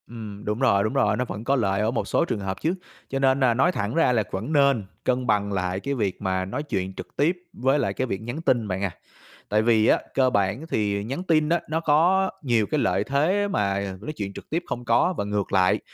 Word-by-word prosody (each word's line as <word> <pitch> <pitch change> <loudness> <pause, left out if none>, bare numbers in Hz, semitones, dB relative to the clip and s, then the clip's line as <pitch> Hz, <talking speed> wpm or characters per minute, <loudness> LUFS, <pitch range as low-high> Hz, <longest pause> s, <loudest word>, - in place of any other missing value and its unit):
Ừm, 110 -3 -9
đúng 105 +2 -2
rồi, 115 -7 +3
đúng 110 - -1
rồi, 105 -7 +2
nó 125 - 0
vẫn 105 -1 -6
có 135 +3 +2
lợi 100 -5 +1
ở 110 +2 +1
một 120 - -2
số - - +2
trường 110 - -2
hợp 95 -1 -4
chứ, 165 - +1 0.4
cho 135 - -2
nên 135 0 +3
nà 130 -3 +4
nói 130 +9 +3
thẳng 105 - -3
ra 165 -6 +4
là 115 -3 +2
vẫn 110 +11 -3
nên 140 -7 +3 0.2
cân 125 0 0
bằng 100 -2 +1
lại 90 -1 -1
cái 140 +7 -3
việc 105 -8 -2
mà 95 -1 -1
nói 125 +10 -4
chuyện 95 -9 -3
trực - - -7
tiếp 165 +6 +2 0.2
với 135 -3 +1
lại - - 0
cái 130 - -2
việc 95 -4 -3
nhắn 120 +8 -5
tin 120 -9 +1
bạn 95 0 -3
à. 100 - 0 0.6
Tại 105 +1 +3
vì 110 -1 +3
á, - - +4
cơ 130 -1 +3
bản 100 +6 0
thì 100 -4 0
nhắn 135 - -4
tin 155 -4 +2
á, 170 +1 +2
nó 160 +1 0
có 170 +5 +3
nhiều 120 -5 +2
cái 155 - +2
lợi - - +1
thế 165 +9 +1
mà 100 - -1
nói 135 - -5
chuyện 100 -4 -5
trực - - -11
tiếp 170 +3 -1
không 120 0 -4
có 120 +10 +3
và - - 0
ngược 105 -1 -2
lại, 90 -3 +3
115 Hz, 250 wpm, -24 LUFS, 100-140 Hz, 0.6 s, nà